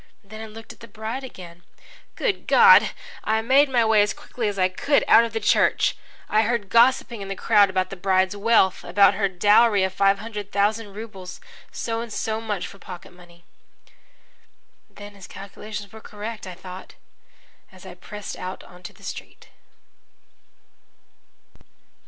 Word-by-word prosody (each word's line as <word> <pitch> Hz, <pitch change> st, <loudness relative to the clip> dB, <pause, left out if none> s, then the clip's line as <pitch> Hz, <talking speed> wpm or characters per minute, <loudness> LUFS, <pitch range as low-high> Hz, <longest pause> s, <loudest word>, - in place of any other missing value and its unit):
Then 215 Hz, +2 st, -11 dB
I 220 Hz, -, -7 dB
looked 225 Hz, +1 st, -11 dB
at -, -, -25 dB
the 230 Hz, -, -12 dB
bride 225 Hz, +4 st, -6 dB
again. 175 Hz, -8 st, -11 dB, 0.5 s
Good -, -, -2 dB
God! 470 Hz, 0 st, +7 dB, 0.3 s
I 220 Hz, +1 st, 0 dB
made 270 Hz, +4 st, +4 dB
my 240 Hz, -3 st, +2 dB
way, 220 Hz, -1 st, +4 dB
as 205 Hz, 0 st, 0 dB
quickly 235 Hz, -3 st, -5 dB
as 205 Hz, -1 st, -3 dB
I 185 Hz, -1 st, +3 dB
could, 280 Hz, +10 st, +1 dB
out 230 Hz, -, +7 dB
of 230 Hz, -, -6 dB
the 225 Hz, -, -2 dB
church. -, -, +2 dB, 0.3 s
I 215 Hz, -, +3 dB
heard 225 Hz, -3 st, -1 dB
gossiping 235 Hz, -1 st, +3 dB
in 195 Hz, -, -6 dB
the 195 Hz, -, -4 dB
crowd 205 Hz, -1 st, +4 dB
about 185 Hz, 0 st, -1 dB
the -, -, -5 dB
bride's 190 Hz, +1 st, +1 dB
wealth 205 Hz, -3 st, +2 dB
about 200 Hz, 0 st, +4 dB
her 200 Hz, -1 st, 0 dB
dowry 205 Hz, +2 st, +4 dB
of 190 Hz, 0 st, -1 dB
five 195 Hz, 0 st, +3 dB
hundred 210 Hz, -1 st, -7 dB
thousand 205 Hz, +1 st, 0 dB
rubles 195 Hz, -4 st, -9 dB, 0.3 s
so 230 Hz, -1 st, -3 dB
and 235 Hz, -1 st, -8 dB
so 220 Hz, +1 st, -3 dB
much 210 Hz, -4 st, -3 dB
for 200 Hz, -, -11 dB
pocket 180 Hz, -1 st, -11 dB
money. 175 Hz, -1 st, -19 dB, 1.5 s
"Then 205 Hz, 0 st, -12 dB
his 195 Hz, -2 st, -13 dB
calculations 200 Hz, +1 st, -9 dB
were 220 Hz, -, -11 dB
correct," 215 Hz, -1 st, -8 dB
I 180 Hz, -, -8 dB
thought, 185 Hz, +1 st, -11 dB, 0.8 s
as 185 Hz, 0 st, -16 dB
I 185 Hz, -, -9 dB
pressed 210 Hz, +3 st, -8 dB
out 185 Hz, +1 st, -7 dB
into 180 Hz, 0 st, -12 dB
the -, -, -21 dB
street. -, -, -9 dB
205 Hz, 165 wpm, -23 LUFS, 190-225 Hz, 1.5 s, God